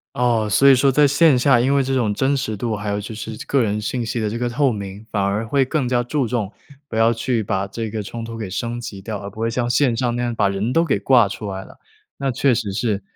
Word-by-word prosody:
哦， 115 -3 +1
所 135 +7 +5
以 135 - +8
说 135 +2 +3
在 145 +2 +4
线 145 -1 +4
下， 125 -1 +4
因 135 +3 +2
为 140 - +3
这 135 0 -1
种 110 -5 +1
真 135 +5 +1
实 110 -6 -3
度 115 +1 -2
还 105 0 -5
有 100 0 -1
就 105 +2 -7
是 110 +1 -6
个 135 -3 +2
人 105 -1 -1
信 120 +3 -2
息 115 +1 -3
的 105 - -1
这 115 - -4
个 120 0 -1
透 135 +1 +1
明， 100 0 -7
反 100 -2 0
而 100 +3 -1
会 135 +3 +2
更 135 -1 -1
加 120 -1 +1
注 130 +2 -1
重， 110 -4 -2 0.4
不 110 - -5
要 115 +1 +4
去 115 0 -1
把 95 -1 -1
这 110 +2 -5
个 110 0 -3
冲 115 +3 -7
突 115 0 -7
给 110 -4 -5
升 120 +5 -3
级 115 -5 -7
掉， 105 +1 -5
而 100 - -7
不 105 - -16
会 115 0 0
像 120 0 -1
线 120 0 +2
上 120 -1 -1
那 120 - -1
样 120 -1 -1
把 100 -3 +2
人 100 +5 -2
都 165 - +3
给 135 -10 +1
挂 120 0 +4
出 100 +1 -6
来 95 0 -5
了。 - - -16 0.4
那 135 -1 -1
确 130 +1 +2
实 105 -4 -2
是， 105 -2 -1
115 Hz, 300 characters per minute, -21 LUFS, 105-130 Hz, 0.4 s, 以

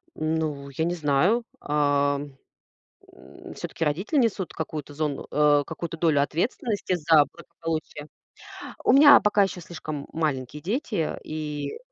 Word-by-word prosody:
Ну, 155 -3 -2
я 160 +4 -2
не 175 - 0
знаю. 165 - +2 0.2
Ам, 145 -1 0 0.8
м, - - -13
всё-таки 165 - -4
родители 185 - 0
несут 215 -7 0
какую-то 150 -2 -5
зону 150 -1 -3
э, 145 -1 +4
какую-то 165 +1 -5
долю 155 -4 +3
ответственности 195 - -1
за 160 -3 +5
благополучие. 160 -3 -6 0.8
У - - +5
меня 285 +2 +9
пока 210 -1 +3
еще 190 -2 -1
слишком 155 -3 -7
маленькие 150 -3 -2
дети 210 - -2
и 150 -2 -5
155 Hz, 125 wpm, -25 LUFS, 145-175 Hz, 0.8 s, меня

